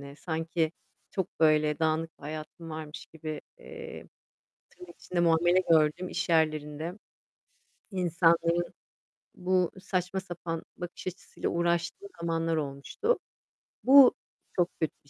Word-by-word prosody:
ne. 140 Hz, 0 st, -10 dB
Sanki 160 Hz, -1 st, -1 dB, 0.4 s
çok 190 Hz, -3 st, -1 dB
böyle 155 Hz, -1 st, +4 dB
dağınık 160 Hz, 0 st, 0 dB
bir -, -, -22 dB
hayatım 155 Hz, +2 st, -7 dB
varmış 155 Hz, -1 st, -7 dB
gibi, 155 Hz, -1 st, -5 dB, 0.2 s
eee, 470 Hz, -1 st, -9 dB, 0.6 s
tırnak 355 Hz, -1 st, -13 dB
içinde 180 Hz, -, -3 dB
"muamele" 175 Hz, +1 st, +4 dB
gördüğüm 160 Hz, +3 st, +4 dB
iş -, -, -2 dB
yerlerinde, 155 Hz, 0 st, +1 dB, 1.0 s
insanların 170 Hz, -2 st, +2 dB, 0.6 s
bu 180 Hz, -1 st, +1 dB
saçma 185 Hz, 0 st, -1 dB
sapan 175 Hz, -3 st, -5 dB
bakış 175 Hz, 0 st, -7 dB
açısıyla 185 Hz, -1 st, -4 dB
uğraştığım 170 Hz, -, 0 dB
zamanlar 165 Hz, -1 st, 0 dB
olmuştu. 145 Hz, -, -1 dB, 0.7 s
Bu 270 Hz, 0 st, +9 dB, 0.4 s
çok 175 Hz, -1 st, +2 dB
kötü 160 Hz, -, +1 dB
bir 140 Hz, -, -24 dB
165 Hz, 115 wpm, -29 LUFS, 155-180 Hz, 1.0 s, Bu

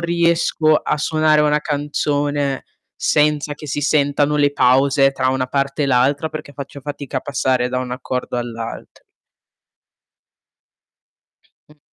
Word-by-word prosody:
riesco 170 Hz, -2 st, +2 dB
a -, -, 0 dB
suonare 155 Hz, 0 st, +2 dB
una 150 Hz, 0 st, +2 dB
canzone 145 Hz, -1 st, -1 dB, 0.3 s
senza 150 Hz, 0 st, +1 dB
che 150 Hz, 0 st, -10 dB
si 145 Hz, -, -2 dB
sentano 145 Hz, 0 st, +1 dB
le 145 Hz, -1 st, +2 dB
pause 135 Hz, +1 st, +3 dB
tra 130 Hz, -1 st, 0 dB
una 130 Hz, 0 st, 0 dB
parte 140 Hz, +2 st, -1 dB
e -, -, 0 dB
l'altra 135 Hz, +4 st, +2 dB
perché 155 Hz, -2 st, -8 dB
faccio 140 Hz, 0 st, -8 dB
fatica 145 Hz, -1 st, -5 dB
a -, -, -10 dB
passare 130 Hz, -3 st, 0 dB
da 125 Hz, 0 st, -2 dB
un 125 Hz, -1 st, -4 dB
accordo 125 Hz, 0 st, -4 dB
all'alt 115 Hz, -1 st, -6 dB, 2.7 s
Mh. 150 Hz, 0 st, -21 dB
145 Hz, 130 wpm, -19 LUFS, 130-150 Hz, 2.7 s, pause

